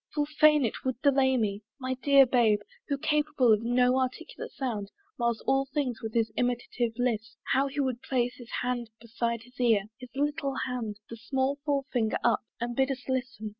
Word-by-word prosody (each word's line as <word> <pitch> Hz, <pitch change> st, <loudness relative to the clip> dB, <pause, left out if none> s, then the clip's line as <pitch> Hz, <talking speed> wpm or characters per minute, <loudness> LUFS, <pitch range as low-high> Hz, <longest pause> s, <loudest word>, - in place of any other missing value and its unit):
Full 295 Hz, -1 st, +2 dB
fain 300 Hz, -1 st, +4 dB
it 225 Hz, -, -4 dB
would 260 Hz, -2 st, -2 dB
delay 265 Hz, -2 st, +4 dB
me! 205 Hz, -3 st, -1 dB, 0.2 s
My 260 Hz, 0 st, -2 dB
dear 275 Hz, +1 st, +5 dB
Babe, 235 Hz, -5 st, +3 dB, 0.3 s
Who, 280 Hz, -, 0 dB
capable 295 Hz, -4 st, +3 dB
of 215 Hz, -, +2 dB
no 250 Hz, +2 st, +3 dB
articulate 260 Hz, +5 st, -4 dB
sound, 220 Hz, -7 st, -3 dB, 0.3 s
Mars 235 Hz, -2 st, 0 dB
all 270 Hz, 0 st, +2 dB
things 265 Hz, -6 st, -1 dB
with 220 Hz, 0 st, -6 dB
his 225 Hz, -1 st, +2 dB
imitative 245 Hz, -1 st, -1 dB
lisp, 230 Hz, -2 st, -1 dB, 0.2 s
How 270 Hz, +2 st, +3 dB
he 280 Hz, +1 st, -2 dB
would 260 Hz, -3 st, -1 dB
place 250 Hz, -2 st, 0 dB
his 240 Hz, -2 st, -12 dB
hand 245 Hz, -2 st, -2 dB
beside 235 Hz, 0 st, -3 dB
his 250 Hz, +2 st, -20 dB
ear, 225 Hz, -5 st, +4 dB, 0.2 s
His 250 Hz, -1 st, -10 dB
little 290 Hz, -1 st, -1 dB
hand, 235 Hz, -5 st, -4 dB
the 230 Hz, -, -8 dB
small 265 Hz, +4 st, -1 dB
forefinger 270 Hz, -6 st, 0 dB
up, 235 Hz, -, +3 dB, 0.2 s
And 240 Hz, 0 st, -3 dB
bid 265 Hz, +1 st, +2 dB
us 260 Hz, -2 st, -4 dB
listen! 250 Hz, -5 st, -2 dB
250 Hz, 185 wpm, -29 LUFS, 230-270 Hz, 0.3 s, dear